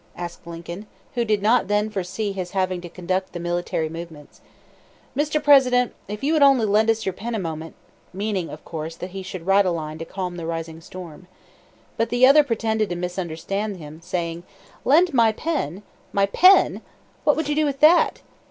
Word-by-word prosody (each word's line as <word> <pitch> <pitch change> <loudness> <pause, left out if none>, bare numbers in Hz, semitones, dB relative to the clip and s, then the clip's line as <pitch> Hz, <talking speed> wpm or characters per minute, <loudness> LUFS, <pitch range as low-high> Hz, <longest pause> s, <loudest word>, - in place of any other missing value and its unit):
asked 175 -1 -7
Lincoln, 170 +4 -8 0.3
who 240 - 0
did 210 -3 0
not 220 -1 +3
then 210 +1 +1
foresee 195 +1 -3
his 185 -2 -5
having 185 -1 0
to 175 - -8
conduct 185 +2 -3
the 175 - -5
military 175 -2 -2
movements. 160 -2 -10 0.7
"Mr. 300 +2 +1
President, 255 -4 +5
if 210 +3 -6
you 300 +3 +2
would 310 - +2
only 270 -5 +6
lend 215 +2 +3
us 225 -1 +1
your 190 - -1
pen 230 +5 -5
a - - -1
moment 160 -2 -5 0.2
" - - -35
meaning, 195 -2 -2
of 150 - -10
course, 160 0 -6
that 180 +2 -7
he 195 +1 -6
should 185 -2 -7
write 195 +1 +5
a - - +3
line 155 -2 -4
to - - -4
calm 180 +1 -5
the 165 -1 -5
rising 165 -1 -5
storm. 180 0 -10 0.7
But 230 - 0
the 245 +1 +5
other 290 +3 +7
pretended 220 -4 -1
to 175 - -2
misunderstand 180 +3 -3
him, 155 0 -11
saying: 170 -1 -3 0.4
"Lend 330 +4 +4
my 230 -3 +4
pen! 210 - -3 0.3
my 200 0 +3
pen? 365 - +5 0.4
What 295 - +4
would 315 -1 -2
you 295 - 0
do 305 +1 +2
with 275 -2 -2
that? 330 +3 +5
195 Hz, 195 wpm, -23 LUFS, 170-230 Hz, 0.7 s, other